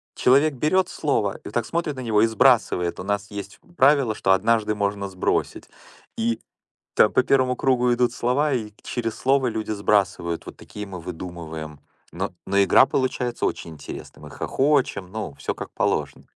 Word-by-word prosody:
Человек 140 +4 +4
берёт 155 +8 +2
слово, 105 -9 -1
и - - -22
вот - - -8
так 120 -2 +1
смотрит 165 -1 -2
на 130 - -6
него, 110 -4 +2
и 115 - +5
сбрасывает. 110 -6 +2
У - - -5
нас 100 +1 -2
есть 100 -1 -7 0.2
правило, 135 -4 +4
что 95 - 0
однажды 105 +2 +2
можно 100 -1 -1
сбросить. 95 -1 -2 0.5
И 115 0 0 0.6
там 105 - +5
по - - +4
первому 130 -1 +2
кругу 125 -1 +2
идут 120 0 +1
слова, 130 +5 +1
и 110 -5 -2
через 115 -3 -3
слово 135 0 +2
люди 110 -2 -4
сбрасывают. 100 -5 0
Вот - - -9
такие 105 - -8
мы 95 -2 -8
выдумываем. 80 -3 -7 0.3
Но 95 +4 -3
но 100 +1 0
игра 100 - +6
получается 125 -2 -1
очень 85 - -4
интересной. 75 - -10
Мы - - -10
хохочем, 135 -10 0
ну, 110 -10 -5
всё - - -3
как - - -8
положено. - - -1
110 Hz, 170 wpm, -23 LUFS, 100-130 Hz, 0.6 s, игра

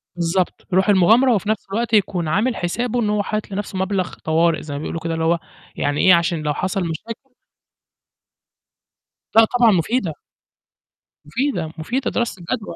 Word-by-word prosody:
بالضبط، 175 +1 -1
رُوح 190 +3 +3
المغامرة 220 +7 +5
وفي 210 -1 -1
نفْس 215 -2 -1
الوقت 230 +2 -2
يكون 185 -5 +2
عامل 215 +10 +1
حسابه 235 +7 -2
إن 215 -3 0
هو 210 -1 +1
حاطط 215 0 -4
لنفْسه 195 -1 -4
مبلغ 190 -1 -1
طوارئ 165 +1 +2
زَي 150 - -7
ما 140 - -4
بيقولوا 160 +2 -4
كده 165 0 -3
اللي 165 0 -2
هو 170 +1 +2 0.4
يعني 145 0 -1
إيه، 185 - +7
عشان 170 -1 +2
لو 150 -1 0
حصل 190 +5 -2
مشاكل 230 - -7 2.0
لأ، 225 0 +8
طبعًا 240 0 +3
مفيدة. 185 - 0 1.1
مفيدة، 170 - -2
مفيدة 245 +12 -2
دراسة 235 -5 -2
الجدوى 205 +2 -4
190 Hz, 160 wpm, -20 LUFS, 165-225 Hz, 2.0 s, لأ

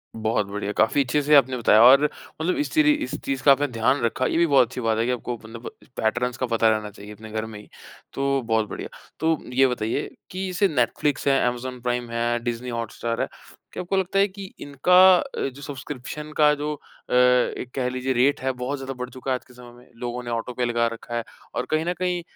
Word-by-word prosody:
बहुत 110 -2 0
बढ़िया। 100 0 -4
काफ़ी 125 +6 +3
अच्छे 140 +3 0
से 150 +1 +5
आपने 130 -2 +4
बताया 110 -2 +5
और 135 +4 +8 0.4
मतलब 175 +3 +1
इस - - -7
तरी 310 -1 +5
इस - - -4
चीज़ 135 -1 -2
का 140 - +7
आपने 145 +1 +3
ध्यान 125 +2 +1
रखा 115 +2 0
ये - - 0
भी 170 - +4
बहुत 140 -5 +5
अच्छी 125 +1 -6
बात 115 -1 +1
है 115 - +1
कि 125 - 0
आपको 125 0 -3
मतलब 115 +2 -8 0.3
पैटर्न्स 120 +3 0
का 130 - -1
पता 115 -1 +3
रहना 110 -1 0
चाहिए 105 +1 -11
अपने 110 +1 -11
घर 110 0 -2
में 110 -2 -9
ही, 105 - -14 0.5
तो 140 0 0
बहुत 110 -2 0
बढ़िया। - - -6 0.3
तो 160 0 +2 0.2
ये 135 +1 +5
बताइए 125 +2 -2 0.2
कि 185 +1 -3
जैसे 185 +2 +2
नेटफ़्लिक्स 145 0 0
है, 135 -1 +4
अमेज़न 125 +1 -4
प्राइम 125 -1 -2
है, 120 0 0
डिज़नी 120 +1 -3
हॉटस्टार 115 0 -3
है। - - 0 0.5
क्या - - -4
आपको 195 +2 -1
लगता 190 +1 +1
है 200 - +5
कि 195 0 -10 0.2
इनका 145 +5 0 0.2
अ, 275 - -4
जो 135 +2 -13
सब्सक्रिप्शन 145 +2 -7
का 150 -1 +5
जो 150 +1 -3
अ, 145 - -11
एक 125 0 +3
कह 130 -2 0
लीजिए 130 +1 -2
रेट 130 +3 +2
है 130 0 0
बहुत 130 +3 -4
ज़्यादा 135 0 -5
बढ़ 125 0 -6
चुका 130 +2 -5
है - - +3
आज - - -19
के 125 - -18
समय 125 -1 -13
में? 120 +1 -18
लोगों 120 +1 -4
ने 120 - -6
ऑटो 115 +2 -3
पे 125 0 -1
लगा 120 -1 +1
रखा 120 +1 -8
है। 115 - -1 0.3
और 125 - -1
कहीं 155 +1 +1
न 175 - 0
कहीं 180 -1 0
125 Hz, 235 wpm, -24 LUFS, 115-145 Hz, 0.5 s, और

